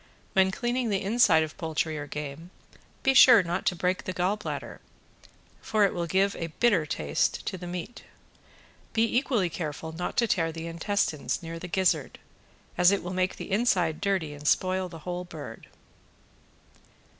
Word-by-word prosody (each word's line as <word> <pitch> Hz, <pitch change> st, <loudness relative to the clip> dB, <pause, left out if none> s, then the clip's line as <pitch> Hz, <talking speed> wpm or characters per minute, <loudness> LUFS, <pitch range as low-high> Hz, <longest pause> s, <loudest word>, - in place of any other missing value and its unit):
When 190 Hz, 0 st, +4 dB
cleaning 240 Hz, +3 st, -1 dB
the 195 Hz, -2 st, 0 dB
inside 195 Hz, -6 st, +4 dB
of 155 Hz, -, -6 dB
poultry 160 Hz, -1 st, -2 dB
or 145 Hz, -1 st, -5 dB
game 150 Hz, +3 st, -6 dB, 0.5 s
be 270 Hz, -, +4 dB
sure 235 Hz, -5 st, +8 dB
not 175 Hz, +2 st, -3 dB
to 180 Hz, -, +2 dB
break 180 Hz, +2 st, -1 dB
the 185 Hz, -, -3 dB
gall 180 Hz, +3 st, +1 dB
bladder, 210 Hz, -, -6 dB, 0.8 s
for 215 Hz, -2 st, +2 dB
it 195 Hz, -, 0 dB
will 170 Hz, -1 st, -2 dB
give 195 Hz, +3 st, +2 dB
a 165 Hz, -, -3 dB
bitter 200 Hz, -10 st, +3 dB
taste 75 Hz, -, -1 dB
to -, -, -3 dB
the 180 Hz, -1 st, -7 dB
meat. 180 Hz, +7 st, -6 dB, 0.9 s
Be 225 Hz, -, +3 dB
equally 240 Hz, -7 st, +2 dB
careful 160 Hz, -1 st, -5 dB
not 170 Hz, +2 st, -5 dB
to 235 Hz, -, +3 dB
tear 165 Hz, -5 st, +1 dB
the 165 Hz, 0 st, -7 dB
intestines 170 Hz, -1 st, -1 dB
near 165 Hz, 0 st, -6 dB
the 180 Hz, -, -7 dB
gizzard, 175 Hz, -6 st, 0 dB, 0.6 s
as 180 Hz, 0 st, +7 dB
it 200 Hz, -, 0 dB
will 180 Hz, +1 st, -5 dB
make 185 Hz, 0 st, 0 dB
the -, -, -8 dB
inside 190 Hz, -7 st, +1 dB
dirty 185 Hz, -7 st, 0 dB
and 145 Hz, 0 st, -7 dB
spoil 185 Hz, +1 st, +1 dB
the 165 Hz, -, -9 dB
whole 180 Hz, 0 st, -3 dB
bird. 155 Hz, -9 st, -9 dB
180 Hz, 170 wpm, -27 LUFS, 160-200 Hz, 0.9 s, sure